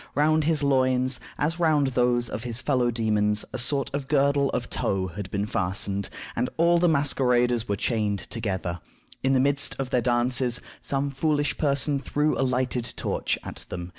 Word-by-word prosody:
Round 155 +1 +3
his 155 -2 +1
loins, 130 -2 +2 0.2
as 165 +4 -1
round 155 -4 +3
those 125 -1 +1
of 110 - -5
his 120 -1 -3
fellow 125 -3 +1
demons, 105 -2 +1
a 130 - -2
sort 135 +3 +1
of 140 -1 -3
girdle 140 -1 +2
of 120 - -2
tow 95 -1 -1
had 95 +2 -7
been 100 +1 -2
fastened, 100 0 -2 0.3
and 125 +2 0
all 170 +1 +4
the 175 0 +3
masqueraders 125 -5 +2
were 100 - +1
chained 105 -1 -1
together. 95 -6 -4 0.4
In 135 0 +2
the 130 - +4
midst 140 +2 +3
of 135 -2 -4
their 125 - +2
dances, 120 0 +1 0.2
some 140 0 -2
foolish 145 +1 0
person 140 -1 +1
threw 150 +2 0
a - - -1
lighted 125 -2 -1
torch - - -1
at - - -8
them. 90 0 -6
130 Hz, 175 wpm, -25 LUFS, 115-140 Hz, 0.4 s, all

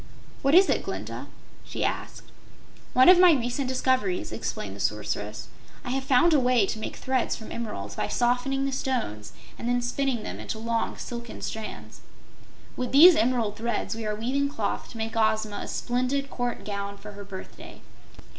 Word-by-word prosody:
"What 275 +2 +4
is 380 +2 +8
it, - - +1
Glinda?" - - -6 0.4
she - - -3
asked. - - -4 0.6
"One 255 +1 +6
of 360 0 +9
my 360 -2 +8
recent 250 0 -1
discoveries," 260 +7 0
explained - - -4
the - - -11
Sorceress. - - -2 0.4
"I 245 - -3
have 265 +1 -1
found 275 +5 +4
a 295 - +5
way 250 -4 +3
to 215 - -4
make - - -5
threads 260 -2 0
from 220 - -10
emeralds, 100 - -5
by - - -1
softening 250 +3 +1
the 275 - -1
stones 240 - -2 0.3
and 235 - -2
then 245 0 +2
spinning 245 -1 -1
them - - -6
into - - -5
long, 230 0 -1
silken 235 -1 -7
strands. 220 -1 -6 0.7
With 250 -1 -3
these 335 +5 +10
emerald 235 -8 +1
threads 235 -1 -2
we 225 -1 -4
are 210 - -1
weaving 265 +6 0
cloth 225 -8 -3
to 235 - -10
make 225 0 -3
Ozma 220 -2 +1
a - - -5
splendid 255 +3 -1
court 245 -1 -3
gown 200 -1 -4
for 210 +1 -10
her 205 0 -9
birthday. 195 -1 -10
245 Hz, 175 wpm, -26 LUFS, 220-270 Hz, 0.7 s, these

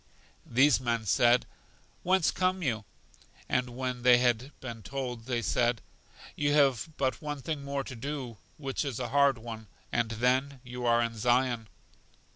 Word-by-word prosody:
These 130 +3 +4
men 120 -3 -1
said: 120 +4 +4 0.6
Whence 185 -1 +3
come 185 0 0
you? 110 -6 -1 0.6
And 125 -1 -1
when 125 -1 -3
they 125 0 +7
had 120 +2 +1
been 120 -3 -7
told 125 0 -5
they 120 -2 -1
said: 120 +1 +1 0.6
You 145 0 +1
have 140 -2 +3
but 130 -4 0
one 145 -2 -5
thing 150 0 -3
more 140 0 -2
to 130 - -8
do, 130 -2 -5 0.2
which 135 -1 -2
is 135 -5 -4
a 125 - -3
hard 140 -2 +4
one, 110 -1 -8 0.2
and 115 -1 +1
then 130 +4 +1
you 125 -1 -5
are 120 0 +4
in 115 0 -3
Zion. 120 0 +1
125 Hz, 160 wpm, -29 LUFS, 120-140 Hz, 0.6 s, they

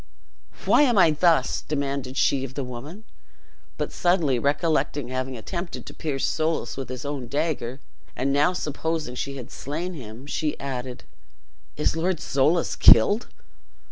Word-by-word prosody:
"Why - - +5
am 245 -7 +4
I 170 -4 +6
thus?" 155 -3 +2
demanded 140 -3 -3
she 135 -2 +2
of 135 0 -7
the 140 - -2
woman; 135 - -8 0.7
but - - -2
suddenly 170 -8 +2
recollecting 145 -1 0
having 130 0 -3
attempted 170 - -5
to - - -9
pierce 145 -4 -2
Soulis 160 +1 -1
with 135 -2 -6
his 130 +1 -6
own 140 -4 -4
dagger, 140 -3 -2 0.4
and 135 +2 0
now 145 +5 +4
supposing 160 -3 -3
she 140 +2 -4
had 125 0 -9
slain 170 +6 -4
him, 120 -4 -9
she 150 +1 -2
added, 130 -2 -5 0.7
"Is 150 - +1
Lord 170 +1 0
Soulis 150 +6 +1
killed?" 205 - +6
145 Hz, 145 wpm, -25 LUFS, 130-160 Hz, 0.7 s, I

